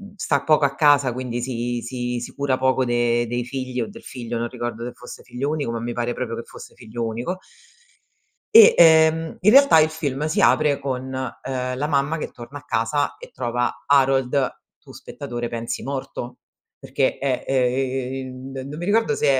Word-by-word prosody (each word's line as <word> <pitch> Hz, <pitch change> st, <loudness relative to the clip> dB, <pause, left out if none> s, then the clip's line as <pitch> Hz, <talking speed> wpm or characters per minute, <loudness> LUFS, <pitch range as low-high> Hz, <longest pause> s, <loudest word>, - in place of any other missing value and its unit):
sta 145 Hz, -7 st, 0 dB
poco 155 Hz, -2 st, +4 dB
a 140 Hz, -, 0 dB
casa, 145 Hz, -5 st, +4 dB
quindi 125 Hz, -1 st, -4 dB
si 120 Hz, -1 st, -3 dB
si 125 Hz, 0 st, -3 dB
si 120 Hz, -, -8 dB
cura 140 Hz, -2 st, 0 dB
poco 130 Hz, 0 st, +2 dB
de 120 Hz, -1 st, +1 dB
dei 120 Hz, 0 st, -2 dB
figli 130 Hz, -1 st, -4 dB
o 115 Hz, -, -2 dB
del -, -, -12 dB
figlio, 120 Hz, -2 st, -6 dB
non 120 Hz, -, -1 dB
ricordo 120 Hz, -1 st, -5 dB
se 120 Hz, -, -5 dB
fosse 125 Hz, -, -11 dB
figlio 130 Hz, +4 st, -4 dB
unico 145 Hz, -7 st, -2 dB
ma, 115 Hz, -, -3 dB
mi 120 Hz, +1 st, -4 dB
pare 120 Hz, 0 st, -2 dB
proprio 120 Hz, -2 st, -4 dB
che 115 Hz, -, -5 dB
fosse -, -, -13 dB
figlio 115 Hz, -1 st, -5 dB
unico. 120 Hz, +12 st, -3 dB, 1.2 s
E, 455 Hz, +1 st, +10 dB
ehm, 160 Hz, 0 st, +5 dB
in 205 Hz, -, +5 dB
realtà, 275 Hz, -, +7 dB
il 155 Hz, -, +4 dB
film 150 Hz, -2 st, -3 dB
si 200 Hz, +6 st, 0 dB
apre 150 Hz, -2 st, +4 dB
con, 130 Hz, -2 st, -3 dB
uhm, 130 Hz, -1 st, -4 dB
la 145 Hz, +3 st, -1 dB
mamma 145 Hz, +2 st, 0 dB
che -, -, -5 dB
torna 125 Hz, +4 st, -10 dB
a 145 Hz, -, -17 dB
casa 115 Hz, +6 st, -1 dB
e -, -, -12 dB
trova 120 Hz, 0 st, -2 dB
Harold, 135 Hz, -1 st, +3 dB, 0.3 s
tu -, -, -16 dB
spettatore 120 Hz, 0 st, -6 dB
pensi, 115 Hz, 0 st, -4 dB
morto, 130 Hz, -2 st, -5 dB, 0.4 s
perché 135 Hz, 0 st, -1 dB
è 135 Hz, -2 st, -1 dB
ehm, 130 Hz, 0 st, -2 dB, 0.2 s
non 150 Hz, -, -7 dB
mi 175 Hz, -, -4 dB
ricordo 225 Hz, +2 st, +2 dB
se -, -, 0 dB
130 Hz, 185 wpm, -22 LUFS, 120-145 Hz, 1.2 s, E